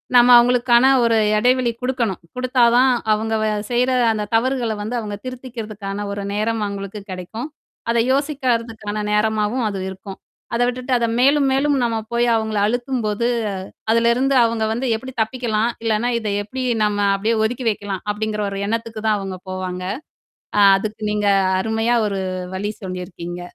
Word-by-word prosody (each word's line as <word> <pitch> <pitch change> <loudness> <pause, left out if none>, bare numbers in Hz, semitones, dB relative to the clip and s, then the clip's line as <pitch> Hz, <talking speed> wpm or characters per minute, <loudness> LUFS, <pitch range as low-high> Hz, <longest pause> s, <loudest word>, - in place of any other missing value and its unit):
நம்ம 245 0 +7
அவங்களுக்கான 240 0 +4 0.2
ஒரு 230 -1 +3 0.2
எடைவெளி 250 +1 +2
கொடுக்கணும். 245 -7 -1
கொடுத்தா 250 -1 +1
தான், 255 0 +5 0.2
அவங்க 220 +1 -1
வ - - +1 0.2
செய்ற, 250 +2 +2 0.2
அந்த 210 -1 -2
தவறுகள 240 -2 +1
வந்து 235 +4 -3
அவங்க 205 -1 -5
திருத்திக்கிறதுக்கான 215 -6 -6
ஒரு 200 0 -4
நேரம் 215 +1 -1
அவங்களுக்கு 200 0 -6
கிடைக்கும். 220 - -6 0.4
அதை 235 0 +2
யோசிக்கறதுக்கான 230 -7 -1
நேரமாவும் 215 +3 +1
அது 195 -2 -4
இருக்கும். 190 +1 -9 0.4
அத 235 - +1
விட்டுட்டு 250 +1 -4
அத 235 -1 0
மேலும், 280 +2 +4
மேலும் 285 +2 +2
நம்ம 230 -1 0 0.2
போய் 235 0 +2
அவங்கள 220 -1 -1
அழுத்தும்போது, 240 -2 -1 0.6
அதுலருந்து 235 +4 +3
அவங்க 230 -1 0
வந்து 240 +4 -2
எப்படி 260 +4 -7
தப்பிக்கலாம், 225 -1 0
இல்லன்னா, 225 +2 +1
இத 220 - -5 0.2
எப்படி 255 +5 -5 0.2
நம்ம 205 -1 0 0.2
அப்படியே 220 +3 0
ஒதுக்கி 245 +2 -2
வைக்கலாம் 200 -3 -4
அப்படிங்கிற 210 0 -2
ஒரு 195 0 -5
எண்ணத்துக்கு 225 0 -3
தான், 215 - +3
அவங்க 190 -1 -5
போவாங்க. 185 -1 -4 0.8
ஆ - - +6 0.2
அதுக்கு 215 +2 -5
நீங்க, 210 -1 0 0.3
அருமையா 225 +3 +1
ஒரு 195 -1 -2 0.3
வழி 205 +2 -2
சொல்லியிருக்கீங்க. 180 -1 -6
225 Hz, 150 wpm, -20 LUFS, 210-245 Hz, 0.8 s, நம்ம